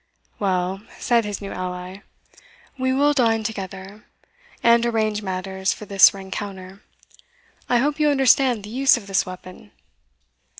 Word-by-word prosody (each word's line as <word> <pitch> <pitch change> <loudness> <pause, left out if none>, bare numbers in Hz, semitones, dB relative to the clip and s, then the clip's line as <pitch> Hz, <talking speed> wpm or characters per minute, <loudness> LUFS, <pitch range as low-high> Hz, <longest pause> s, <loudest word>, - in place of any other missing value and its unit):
"Well," 190 -1 -1 0.2
said 235 -2 +1
his 205 -1 -5
new 195 - -6
ally, 180 0 -6 0.8
"we 260 -1 -1
will 285 +3 +3
dine 225 -5 +2
together 195 -1 -7 0.6
and 235 0 +5
arrange 220 -3 0
matters 190 0 -2
for 210 - -10
this 195 -1 +6
rencounter. 195 0 -8 0.9
I 245 - +3
hope 290 +5 0
you 300 -1 +3
understand 265 -4 +3
the 210 - -9
use 265 +1 +4
of 225 - -9
the 195 -1 +1
weapon?" 185 - -11
205 Hz, 135 wpm, -22 LUFS, 190-240 Hz, 0.9 s, this